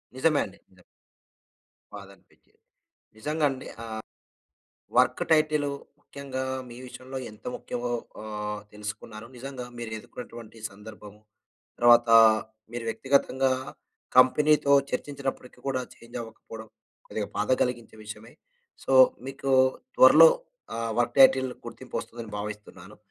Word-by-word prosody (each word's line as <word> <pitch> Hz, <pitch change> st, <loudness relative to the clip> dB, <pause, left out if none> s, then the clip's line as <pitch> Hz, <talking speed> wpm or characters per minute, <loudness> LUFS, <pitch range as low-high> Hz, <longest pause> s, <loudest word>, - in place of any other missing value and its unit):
నిజమే 145 Hz, +2 st, +2 dB
అండి. 95 Hz, 0 st, -13 dB
నిజం. 95 Hz, -1 st, -23 dB, 1.1 s
బాధనిపించేది. 100 Hz, -1 st, -16 dB, 0.6 s
నిజంగా 150 Hz, +6 st, -1 dB
అండి. 130 Hz, -1 st, -8 dB, 0.2 s
ఆహ్, 110 Hz, -1 st, -6 dB, 1.0 s
వర్క్ -, -, +3 dB
టైటిల్ 155 Hz, -2 st, +3 dB, 0.3 s
ముఖ్యంగా 140 Hz, -2 st, -6 dB, 0.2 s
మీ 120 Hz, -, -11 dB
విషయంలో 130 Hz, +1 st, -8 dB
ఎంత 105 Hz, -, -18 dB
ముఖ్యమో 120 Hz, 0 st, -4 dB, 0.3 s
ఆహ్, 105 Hz, -1 st, -5 dB
తెలుసుకున్నారు. 105 Hz, +1 st, -7 dB
నిజంగా 130 Hz, 0 st, -7 dB
మీరు 115 Hz, -2 st, -6 dB
ఎదుర్కున్నటువంటి 115 Hz, 0 st, -11 dB
సందర్భము, 105 Hz, 0 st, -13 dB, 0.6 s
తర్వాత 120 Hz, -1 st, +6 dB, 0.6 s
మీరు 120 Hz, -1 st, -5 dB
వ్యక్తిగతంగా 135 Hz, +1 st, +1 dB, 0.6 s
కంపెనీతో 140 Hz, +3 st, +5 dB, 0.2 s
చర్చించినప్పటికి 135 Hz, -1 st, -5 dB
కూడా 135 Hz, -2 st, 0 dB
చేంజ్ 120 Hz, +1 st, -12 dB
అవ్వకపోవడం, 115 Hz, 0 st, -11 dB, 0.4 s
కొద్దిగా -, -, -4 dB
బాధ -, -, 0 dB
కలిగించే 120 Hz, -3 st, -4 dB
విషయమే. 110 Hz, +2 st, -10 dB, 0.5 s
సో -, -, -1 dB, 0.4 s
మీకు 135 Hz, 0 st, -4 dB, 0.5 s
త్వరలో -, -, +9 dB, 0.5 s
ఆహ్, 115 Hz, 0 st, -2 dB
వర్క్ 120 Hz, +1 st, 0 dB
టైటిల్ 130 Hz, -1 st, +6 dB, 0.2 s
గుర్తింపు -, -, -8 dB
వస్తుందని 115 Hz, -2 st, -9 dB
భావిస్తున్నాను. 105 Hz, -2 st, -8 dB
120 Hz, 105 wpm, -27 LUFS, 110-135 Hz, 1.1 s, త్వరలో